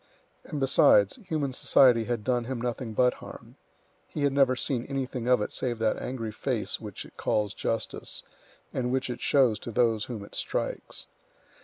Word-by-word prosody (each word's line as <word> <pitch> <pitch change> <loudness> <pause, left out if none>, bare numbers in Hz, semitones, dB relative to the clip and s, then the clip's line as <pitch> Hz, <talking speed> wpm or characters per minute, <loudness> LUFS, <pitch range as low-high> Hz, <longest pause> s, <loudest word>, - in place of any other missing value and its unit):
And 150 - -5
besides, 140 - +5
human 145 -5 -1
society 125 -3 +5
had 120 -2 -2
done 120 -1 0
him 130 0 -3
nothing 120 -1 -3
but 125 +1 +4
harm; - - -11 0.5
he 150 - -4
had 140 -1 +2
never 135 -2 +4
seen 125 -2 -1
anything 130 -3 -3
of 125 -4 +4
it - - -5
save 120 -2 -2
that 110 -1 0
angry 115 -4 -4
face - - -2
which - - -7
it - - -17
calls 105 -1 0
Justice, 115 -1 -3 0.5
and 125 -1 -1
which 130 -1 0
it 120 - -7
shows 130 -6 +3
to - - -7
those 115 -1 +2
whom 110 -5 -6
it - - -17
strikes. - - -3
125 Hz, 175 wpm, -28 LUFS, 115-130 Hz, 0.5 s, besides